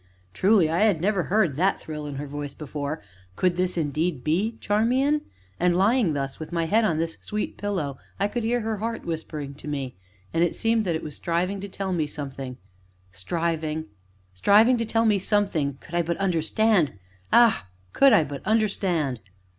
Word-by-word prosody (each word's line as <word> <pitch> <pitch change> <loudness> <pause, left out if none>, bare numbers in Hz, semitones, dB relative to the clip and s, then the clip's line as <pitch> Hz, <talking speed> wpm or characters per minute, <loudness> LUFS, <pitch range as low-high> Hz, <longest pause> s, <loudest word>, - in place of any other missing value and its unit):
Truly 190 - +4
I 165 +2 0
had 210 -6 +3
never 190 +1 +1
heard 185 -8 +2
that 190 +4 +2
thrill 150 -1 -6
in 145 - -5
her 140 +2 -4
voice 145 0 -6
before 150 +1 -5 0.3
could 180 -1 +1
this 180 0 0
indeed 155 -2 -1
be 200 +9 0
Charmian? 255 +8 +2 0.4
And 175 0 +3
lying 200 -1 +3
thus, 135 -1 -3
with 155 - -7
my 170 -1 0
head 220 +7 +3
on 170 -7 +1
this 165 0 -3
sweet 210 0 -3
pillow, 175 -10 -3 0.2
I 200 - +2
could 235 +3 -3
hear 240 +2 +1
her 220 0 -2
heart 225 +3 -4
whispering 155 -4 -4
to 145 - -12
me, 140 -4 -3 0.4
and 165 +1 +3
it 175 - 0
seemed 225 -1 +1
that 170 -3 0
it 160 - -4
was 150 - -6
striving 180 +5 -1
to 200 - -6
tell 190 0 -3
me 160 -4 0
something 135 -3 -6 0.5
striving, 160 - -2 0.5
striving 215 - +5
to 230 - 0
tell 225 +1 +1
me 210 -3 +3
something, 190 -9 +1
could 170 - -15
I 175 - +3
but 170 0 -2
understand 185 - +2 0.4
ah! 230 - +5 0.3
could 275 -1 +6
I 210 -8 +6
but 140 -2 -6
understand! 185 - 0
175 Hz, 185 wpm, -25 LUFS, 150-210 Hz, 0.5 s, could